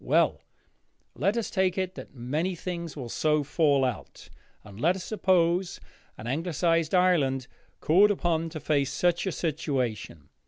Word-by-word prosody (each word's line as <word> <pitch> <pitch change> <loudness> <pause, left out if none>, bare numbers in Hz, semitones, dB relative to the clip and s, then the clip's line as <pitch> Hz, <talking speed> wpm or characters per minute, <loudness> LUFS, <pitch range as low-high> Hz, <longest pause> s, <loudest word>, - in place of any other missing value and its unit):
Well, - - +2 0.7
let 195 - 0
us 230 - -2
take 190 -2 +1
it 185 -1 -1
that - - -9 0.5
things 170 -3 -5
will 130 -4 -5
so 150 +5 +1
fall 145 -2 +2
out, 125 - -6 0.3
and 105 +1 -12
let 175 +4 +3
us 190 - -6
suppose 180 -3 +1 0.4
an 105 - -9
Anglicised 165 +4 0
Ireland 150 -8 +2 0.4
called 195 +7 +5
upon 165 -4 0
to 160 -1 -7
face 145 -3 0
such 175 +1 +1
a - - 0
situation. 130 - -3
165 Hz, 145 wpm, -27 LUFS, 140-180 Hz, 0.7 s, called